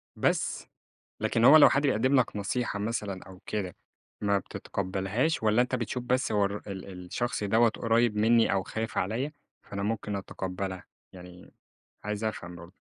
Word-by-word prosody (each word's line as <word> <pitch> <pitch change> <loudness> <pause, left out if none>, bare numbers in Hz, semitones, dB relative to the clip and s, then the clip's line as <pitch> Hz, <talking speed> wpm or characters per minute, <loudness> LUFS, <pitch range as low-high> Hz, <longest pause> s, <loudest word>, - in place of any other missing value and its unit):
بس، - - 0 0.5
لكن 115 +1 +2
هو 155 +4 +10
لو 150 - +9
حد 140 - +2
بيقدّم 130 -1 +2
لك 120 - 0
نصيحة 105 +1 -2
مثلًا 105 -3 -3
أو 95 -1 -12
كده 95 -4 -3 0.5
ما 100 -1 +2
بتتقبَّلهاش، 100 - -2
والّا 110 +2 +4
أنتَ 125 +1 0
بتشوف 125 +1 -3
بس 125 0 0
هو 105 -1 +3
الر 100 +1 -3
ال 95 0 -7
الشخص 120 +4 -2
دوّة 115 +3 +4
قريب 115 0 +1
مني 115 0 +4
أو 95 -1 +1
خايِف 110 +2 -4
عليّا، 120 +10 -1 0.3
فأنا 100 0 -5
ممكن 105 -1 -2
أتقبَّلها؟ 95 -1 -5 0.3
يعني 90 -1 -13 0.5
عايِز 105 +1 -3
أفهَم 90 -5 -4
برضه. 85 +1 -12
105 Hz, 160 wpm, -28 LUFS, 95-120 Hz, 0.5 s, هو